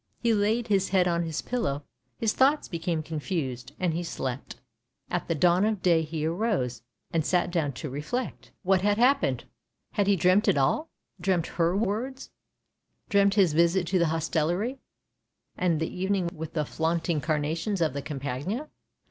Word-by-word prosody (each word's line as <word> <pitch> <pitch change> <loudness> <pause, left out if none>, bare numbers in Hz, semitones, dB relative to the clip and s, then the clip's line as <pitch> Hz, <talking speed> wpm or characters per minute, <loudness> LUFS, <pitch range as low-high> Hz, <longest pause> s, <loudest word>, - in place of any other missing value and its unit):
He 235 -1 +2
laid 220 +3 +1
his 195 -3 +2
head 185 -2 +3
on 170 -1 +1
his 165 -2 -3
pillow; 145 - -2 0.3
his 225 -2 +1
thoughts 280 +3 +3
became 165 -2 -2
confused, 145 -5 -4
and 180 -3 +1
he 170 - -1
slept. 135 -6 -4 0.6
At 175 - -1
the 165 - 0
dawn 175 +4 +4
of 215 -3 0
day 170 -3 +4
he 155 -1 -3
arose, 170 - -1 0.3
and 165 -1 +1
sat 175 +2 +1
down 155 -5 0
to 140 - -6
reflect. 150 - -4
What 190 0 +4
PSYCHE - - -7
in - - +3
had 205 - +2
happened? 270 +4 +3 0.5
Had 205 -2 +1
he 200 - +5
dreamt 185 +3 +3
it - - +4
all 225 - +1 0.2
— 185 - -24
dreamt 175 -2 +1
her 170 +2 0
words 230 +6 -2 0.4
— - - -47
dreamt 200 -1 +4
his 190 -7 +4
visit 170 +3 +3
to 185 -1 +2
the 170 - +3
hostelry, 165 - 0 0.8
and 175 -4 +1
the 160 - -3
evening 190 -3 0
with 160 0 -7
the 150 -2 0
flaunt 165 +2 -1
ing 160 -4 +1
carnations 160 +6 -1
of 160 -5 +1
the 140 - -3
Campagna 145 - -4
175 Hz, 180 wpm, -27 LUFS, 155-200 Hz, 0.8 s, he